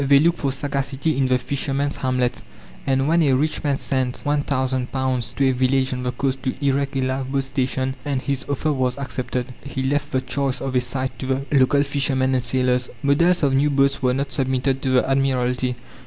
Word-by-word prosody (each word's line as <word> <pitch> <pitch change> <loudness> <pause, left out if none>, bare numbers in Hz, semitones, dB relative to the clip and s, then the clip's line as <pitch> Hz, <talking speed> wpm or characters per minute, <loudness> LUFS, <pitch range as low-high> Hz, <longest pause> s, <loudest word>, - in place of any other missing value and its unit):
They 140 0 +6
looked 170 +4 +3
for 140 - 0
sagacity 140 +2 -1
in 135 -1 +2
the 130 0 +3
fishermen's 140 +2 -2
hamlets, 125 -1 0 0.5
and 135 0 +2
when 170 +2 +3
a 140 -4 +3
rich 150 +6 0
man 140 -2 +1
sent 130 -2 -2
£1,000 130 -3 -1
to 135 - +2
a - - +4
village 130 +1 +1
on 125 - -3
the 125 0 -1
coast 135 +1 -2
to 130 - -2
erect 140 0 +1
a 135 - +1
lifeboat 130 +1 -1
station, 130 -1 -1
and 140 -1 -1
his 135 0 -2
offer 150 +2 0
was 130 -1 0
accepted, 130 -2 -4
he 135 -1 -4
left 145 +2 -1
the 130 - +1
choice 130 0 -1
of 135 -1 -3
a 125 - +4
site 130 +1 -3
to 130 - -4
the 135 +1 -1
local 140 +1 +4
fishermen 135 -2 0
and 130 -1 +1
sailors. 125 0 +1
Models 170 +5 +3
of 140 -2 +3
new 140 +2 +3
boats 140 -1 +2
were 125 -1 +2
not 140 +1 -2
submitted 130 +1 0
to 135 - -1
the 130 0 +3
Admiralty. 130 -2 +1
135 Hz, 200 wpm, -22 LUFS, 130-140 Hz, 0.5 s, They